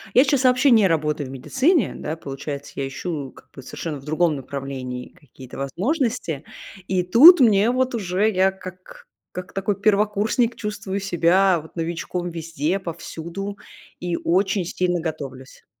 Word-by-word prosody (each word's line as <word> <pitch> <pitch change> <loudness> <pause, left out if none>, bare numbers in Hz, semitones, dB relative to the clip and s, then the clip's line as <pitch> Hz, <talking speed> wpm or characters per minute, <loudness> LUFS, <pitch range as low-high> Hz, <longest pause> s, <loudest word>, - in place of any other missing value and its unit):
Я 255 - +8
сейчас 270 -2 +1
вообще 255 +2 +4
не 220 -4 +6
работаю 150 -4 -1
в - - -9
медицине, 265 - +1
да, 155 - -5
получается, 140 -1 -7
я 135 - -2
ищу 140 -1 -5
как - - -19
бы 135 - -11
совершенно 150 +3 -6
в 135 - -15
другом 155 0 +1
направлении 130 -2 -6
какие-то 130 -3 -14
возможности. 190 - -2 0.4
И 185 -1 +1
тут 280 - +8
мне 215 -2 +5
вот 255 +1 0
уже 200 0 0
я 190 -1 +3
как 185 -1 -12 0.3
как 180 0 -7
такой 195 +1 -1
первокурсник 215 +3 +1
чувствую 200 -2 -4
себя 185 0 +3
вот 160 - -16
новичком 170 +1 -3
везде, 165 +1 -2
повсюду 170 +3 -6 0.4
и 175 -1 -2
очень 190 +3 +1
сильно 180 0 -1
готовлюсь. 135 -5 -7
180 Hz, 150 wpm, -22 LUFS, 155-210 Hz, 0.4 s, Я